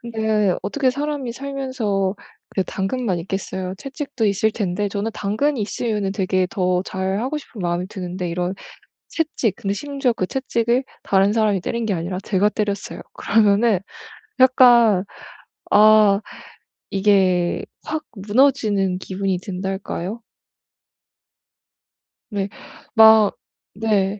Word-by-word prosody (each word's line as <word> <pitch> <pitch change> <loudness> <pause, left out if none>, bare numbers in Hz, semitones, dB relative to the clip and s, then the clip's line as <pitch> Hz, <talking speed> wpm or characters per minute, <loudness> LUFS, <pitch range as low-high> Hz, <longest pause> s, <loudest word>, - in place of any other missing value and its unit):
근데 220 -4 0
어떻게 270 -3 +1
사람이 285 -2 -3
살면서 255 -8 -2 0.3
그래 190 - -1
당근만 195 -1 -2
있겠어요 190 0 -4
채찍도 275 -4 -3
있을 205 +2 +2
텐데 205 -1 -2
저는 205 +2 -3
당근이 220 +7 -1
있으면은 210 -1 -2
되게 185 -1 0
더 180 -3 0
잘하고 195 +10 -2
싶은 245 -7 -12
마음이 175 0 -1
드는데 180 -2 -5
이런 180 +2 -2 0.5
채찍, 285 - -1
근데 195 - -2
심지어 275 +1 -1
그 185 - -2
채찍을 240 +1 0 0.2
다른 195 +1 +3
사람이 215 -3 +2
때린 235 -1 -2
게 205 - 0
아니라 180 +2 -3
제가 200 +1 +2
때렸어요. 205 -2 -3
그러면은 210 0 +3 0.6
약간 240 -6 +6 0.7
아 210 -1 +6 0.7
이게 190 -3 +2 0.2
확 310 0 -4
무너지는 205 -3 +2
기분이 190 0 -2
든달까요? 190 +2 -5 2.1
네. 200 -2 -2 0.5
막 220 -2 +7 0.4
네. 205 -2 0
205 Hz, 260 characters per minute, -21 LUFS, 190-235 Hz, 2.1 s, 막